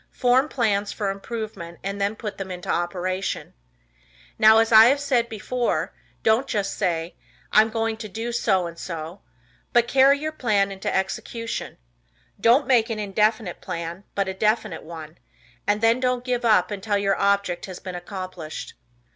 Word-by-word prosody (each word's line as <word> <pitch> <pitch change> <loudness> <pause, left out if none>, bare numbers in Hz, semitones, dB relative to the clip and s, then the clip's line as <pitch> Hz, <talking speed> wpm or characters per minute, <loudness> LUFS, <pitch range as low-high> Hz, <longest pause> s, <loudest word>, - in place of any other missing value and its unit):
Form 255 +3 +2
plans 210 -6 0
for 200 -3 -2
improvement 195 -4 -6
and 200 +1 -4
then 200 +2 0
put 210 -3 -6
them 195 -1 -5
into 180 -1 -7
operation. 185 +2 -2 0.9
Now, 220 +1 +7
as 225 0 +3
I 225 +4 +8
said 260 -5 0
before, 220 -5 -2 0.3
don't 225 +5 +3
just 200 -4 -1
say, 170 -3 -1 0.4
"I 215 - +7
am 220 - 0
going 225 0 -1
to 220 -1 -7
do 225 +4 -4
so 190 -6 +1
and 170 0 -8
so," 165 +2 -6 0.5
but 240 0 +4
carry 275 +2 +5
your 310 +2 -3
plan 210 -9 +1
into 195 0 -3
execution. 230 +4 -3 0.6
Don't 250 +5 +4
make 240 -4 +3
an 225 - -2
indefinite 210 -1 0
plan, 170 +3 -5
but 200 -1 0
a 190 - -2
definite 215 +4 0
one, 160 0 -10 0.5
and 205 +1 +2
then 230 +2 +4
don't 250 -1 0
give 245 -1 -1
up 210 -6 +3
until 205 +1 -1
your 195 -1 +1
object 200 -3 +1
has 185 -2 -7
been 185 - -7
accomplished. 180 -3 -7
205 Hz, 165 wpm, -24 LUFS, 185-230 Hz, 0.9 s, I